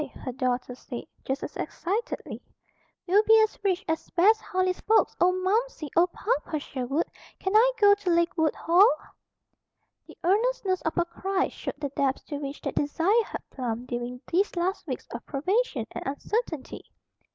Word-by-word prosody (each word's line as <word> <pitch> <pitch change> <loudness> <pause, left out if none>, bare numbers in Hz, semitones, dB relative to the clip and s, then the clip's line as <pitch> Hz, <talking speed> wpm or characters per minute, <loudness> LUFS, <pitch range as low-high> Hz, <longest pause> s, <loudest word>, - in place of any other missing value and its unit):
her 255 - -5
daughter 250 0 -1
said, 245 -1 -7 0.2
just 265 +1 -2
as - - -6
excitedly, 430 +8 -3 0.6
"we'll 385 +3 +5
be 445 +1 +6
as 435 - 0
rich 375 -3 0
as 320 0 -2
Bess 430 +5 +4
Harley's 370 0 0
folks. 440 +1 +3
Oh, 360 +1 +6
Momsey! 370 - -1
Oh, 340 +2 +5
Papa 365 -3 -2
Sherwood! 275 +2 -2 0.3
Can 380 +2 -2
I 480 +3 +7
go 410 -1 +7
to 405 -2 -2
Lakewood 340 -2 +2
Hall?" 360 +6 +5 1.2
The - - -14
earnestness 400 0 +1
of 320 - -2
her 345 - +2
cry 380 +2 -1
showed - - -6
the 285 - -2
depths 270 0 0
to 290 - -3
which 280 0 -6
that - - -3
desire 350 +10 +2
had - - -7
plumbed 245 -1 -4
during 245 0 -4
these 380 +4 +1
last 360 +1 -1
weeks 260 - -4
of 235 - -6
privation 305 - 0
and - - -6
uncertainty. 315 - -3
345 Hz, 165 wpm, -27 LUFS, 280-405 Hz, 1.2 s, I